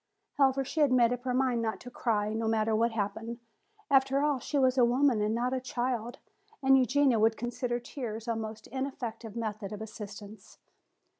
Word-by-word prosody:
However, 270 -1 +3
she 315 - -4
had 290 -3 +4
made 245 -1 +4
up 245 +1 -6
her 250 - 0
mind 255 -3 +1
not 220 -1 -2
to 250 - -10
cry, 215 -4 0
no 225 0 -1
matter 220 0 +1
what 230 +2 +2
happened. 225 +2 -3 0.5
After 270 +1 +4
all, 295 -3 +1
she 290 +4 -3
was 260 -2 +3
a 255 - +4
woman 245 -1 +3
and 210 +1 +1
not 245 +2 0
a 260 - -1
child, 245 -2 -2 0.5
and 270 0 +6
Eugenia 265 -1 +3
would 220 +1 +3
consider 240 0 -2
tears 235 -3 -6
a 230 - 0
most 220 0 -6
ineffective 240 -4 -5
method 215 -3 -4
of 210 - -6
assistance. 210 -1 -9
240 Hz, 190 wpm, -30 LUFS, 220-260 Hz, 0.5 s, and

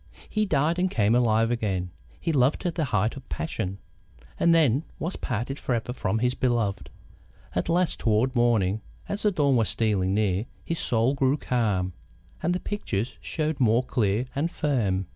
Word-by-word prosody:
He 215 -1 0
died 160 +2 +1
and 185 +1 +2
came 110 - +2
alive 115 -1 +3
again; 95 -6 -1 0.3
he 165 - -1
loved 135 0 +3
to 175 - -1
the 165 -2 -1
height 110 -3 0
of 135 -2 -11
passion, 95 - -3 0.6
and 170 - +4
then 150 -4 +4
was 170 +4 -3
parted 125 +4 -3
forever 120 -1 -2
from 110 -4 -1
his 125 +2 +1
beloved. 120 -7 0 0.6
At - - -1
last, 175 0 +2
toward 115 +4 +1
morning, 110 -4 +2 0.3
as 200 - -3
the 210 - +3
dawn 140 -7 +2
was 115 - +2
stealing 100 -4 +1
near, 105 +1 +1 0.2
his 165 - -2
soul 120 +3 +2
grew 135 +1 +2
calm, 105 -9 0 0.5
and 175 +2 +1
the - - -1
pictures 120 - -3
showed 155 -1 -2
more 120 0 +4
clear 115 -2 0
and 150 +5 0
firm. 105 - 0
120 Hz, 170 wpm, -26 LUFS, 105-150 Hz, 0.6 s, and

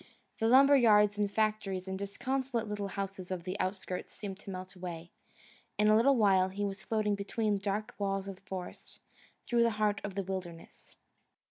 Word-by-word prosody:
The 225 - +2
lumber 275 +4 +7
yards 210 -5 +5
and 205 -1 +2
factories 210 -3 -1
and 190 0 -4
disconsolate 240 +4 -2
little 205 -1 -3
houses 195 -1 -5
of 185 -2 -4
the 185 +1 -4
outskirts 185 -1 -3
seemed 195 -2 -7
to - - -11
melt 185 -1 -7
away. 175 -2 -7 0.7
In 210 0 +4
a 215 - +6
little 265 +5 +5
while 190 -4 +4
he 200 +2 -3
was 195 0 -4
floating 215 -2 0
between 205 +1 -1
dark 205 +2 -2
walls 195 -1 -1
of 195 -1 -7
forest, 190 -2 -8 0.5
through 240 -1 +2
the 235 - +5
heart 210 -1 +1
of 200 -2 -5
the 200 - -1
wilderness. 180 -3 -7
200 Hz, 175 wpm, -31 LUFS, 190-215 Hz, 0.7 s, lumber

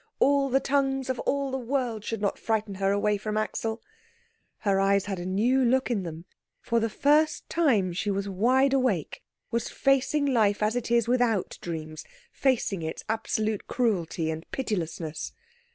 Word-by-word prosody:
All 280 0 +3
the 265 +1 +3
tongues 270 -1 0
of 255 - -5
all 280 -1 0
the 265 - -2
world 245 -4 -2
should 225 -2 -4
not 200 - 0
frighten 220 -2 -1
her 195 0 +3
away 205 +1 +1
from 215 +1 -3
Axel. 220 +1 -2 0.8
Her 195 -2 +2
eyes 195 0 +3
had 195 -3 -3
a 175 - -4
new 235 +8 +2
look 255 +1 +2
in 215 -5 0
them. 165 -1 -7 0.3
For 235 - 0
the 225 0 0
first 300 +7 +2
time 225 - +2
she 195 +4 -2
was 200 0 -1
wide 255 +8 +3
awake, 260 -1 0 0.3
was 235 -1 -1
facing 275 +2 +2
life 215 -6 +2
as 215 +2 +1
it 245 -2 -2
is 235 -1 +3
without 240 -5 +1
dreams, 155 -2 -6 0.3
facing 240 -8 0
its 160 0 -5
absolute 220 -1 -1
cruelty 175 -9 0
and 160 0 -5
pitilessness. 165 - -3
220 Hz, 170 wpm, -27 LUFS, 195-260 Hz, 0.8 s, All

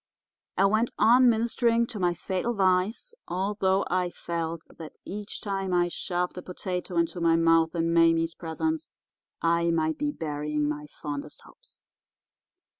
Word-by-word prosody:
I 195 - +5
went 220 +4 +2
on 245 +2 +6
ministering 235 +1 +2
to 230 -3 -7
my 175 -1 +1
fatal 190 +7 -2
vice, 195 - +1
although 190 +1 0
I 180 0 0
felt 165 -1 -4
that 160 -2 -8
each 205 +2 -6
time 195 -3 -2
I 175 0 +2
shoved 180 +1 -3
a - - -7
potato 180 -1 -5
into 170 +1 0
my 165 -1 +4
mouth 165 0 +3
in 165 0 +1
Mame's 165 0 +4
presence 310 - -3 0.5
I 170 0 +2
might 160 -1 0
be 295 0 0
burying 150 - -2
my 150 0 -4
fondest 145 -1 -7
hopes. - - -18
180 Hz, 145 wpm, -27 LUFS, 165-205 Hz, 0.5 s, on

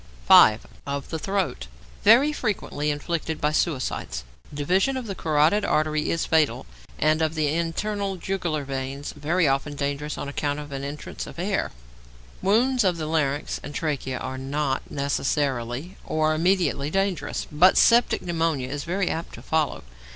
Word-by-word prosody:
5. - - +7 0.2
=Of 140 -1 -4
the 160 - -2
Throat.= 180 - -2 0.4
Very 255 +8 +6
frequently 195 - -2
inflicted 160 +2 -2
by 150 - +1
suicides. 130 - -1 0.3
Division 185 - +1
of 255 - -4
the 200 - -4
carotid 160 +4 +2
artery 155 0 +1
is 165 - 0
fatal, 160 -3 +2 0.3
and 155 +1 +2
of 160 0 0
the 155 -2 +1
internal 195 +5 -2
jugular 175 -4 -2
vein 135 +1 -4
very 160 +3 +1 0.3
dangerous 145 +1 -3
on 145 - -4
account 145 0 -2
of 145 -1 -8
entrance 140 +2 -6
of - - -11
air. 190 +3 -1 0.7
Wounds 240 +5 +3
of 180 -3 +2
the 155 - -3
larynx 150 -2 -1
and 145 - -8
trachea 140 -5 -2
are 130 0 -5
not 135 0 -1
necessarily 140 - -2
or 155 0 +1
immediately 170 -3 +1
dangerous, 195 -1 -1
but 175 +5 +5
septic 235 +1 +4
pneumonia 165 -6 -1
is 145 +1 -4
very 185 +2 -1
apt 165 0 -3
to - - -12
follow. 160 - 0
155 Hz, 150 wpm, -25 LUFS, 145-185 Hz, 0.7 s, 5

